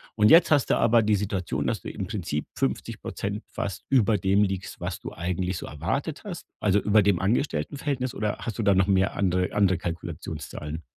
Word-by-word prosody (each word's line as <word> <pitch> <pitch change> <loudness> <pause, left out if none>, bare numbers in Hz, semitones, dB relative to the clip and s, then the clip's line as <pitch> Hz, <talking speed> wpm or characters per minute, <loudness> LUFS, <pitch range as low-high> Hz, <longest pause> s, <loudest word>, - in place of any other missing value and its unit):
und 105 -1 +5
jetzt 165 0 +7
hast 145 -4 +3
du - - +4
aber 115 0 +4
die 105 0 +2
Situation, 100 -2 -2
dass - - 0
du - - -6
im 95 - -4
Prinzip 85 -7 -3
50% 100 +2 -3
fast 100 - -5
über 115 -5 +4
dem 100 +2 +3
liegst, 95 -2 -3
was - - -3
du - - -7
eigentlich 90 +1 -2
so - - -6
erwartet 135 - -3
hast. 185 -4 -6 0.2
Also, 105 -1 +3
über 105 +1 +4
dem 100 -3 +2
Angestelltenverhältnis 130 - -1
oder 105 -1 -2
hast 115 -1 -5
du - - +1
da 100 -1 +4
noch 95 0 +3
mehr 95 0 +2
andere 90 -1 0
andere 95 -3 +3
Kalkulationszahlen? 80 -2 -6
100 Hz, 190 wpm, -26 LUFS, 90-110 Hz, 0.2 s, jetzt